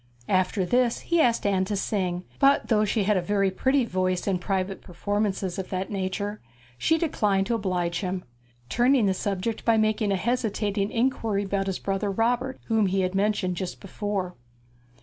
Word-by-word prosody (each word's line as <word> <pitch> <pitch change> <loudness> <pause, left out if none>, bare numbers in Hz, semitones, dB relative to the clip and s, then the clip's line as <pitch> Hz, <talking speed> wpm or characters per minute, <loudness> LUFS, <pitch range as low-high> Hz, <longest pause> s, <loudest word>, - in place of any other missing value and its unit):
After 185 +1 +2
this 245 +4 +2
he 340 -1 +2
asked 235 -6 +2
Anne 195 -2 +2
to 205 - -2
sing, 185 -3 -1 0.2
but 280 0 +4
though 215 -2 +3
she 210 +1 +1
had 205 0 +2
a - - +1
very 195 +1 +1
pretty 265 +6 +2
voice 185 -3 -1
in 190 -3 0
private 190 +1 -2
performances 195 0 -2
of 190 - -5
that 185 +1 -3
nature, 200 +2 -3 0.3
she 320 - +2
declined 210 - +1
to 235 - -1
oblige 180 -5 -1
him; 185 -1 -3 0.4
turning 245 - +3
the 190 - +3
subject 200 +3 -2
by 230 -1 +3
making 215 -1 +1
a - - +2
hesitating 210 -2 -1
inquiry 225 -4 0
about 195 0 -1
his 190 - -1
brother 195 +1 -2
Robert, 245 +6 0
whom 220 -3 +2
he 190 +1 +1
had 185 0 -1
mentioned 195 -2 0
just 185 0 -4
before. 195 -2 -3
200 Hz, 175 wpm, -26 LUFS, 185-225 Hz, 0.4 s, but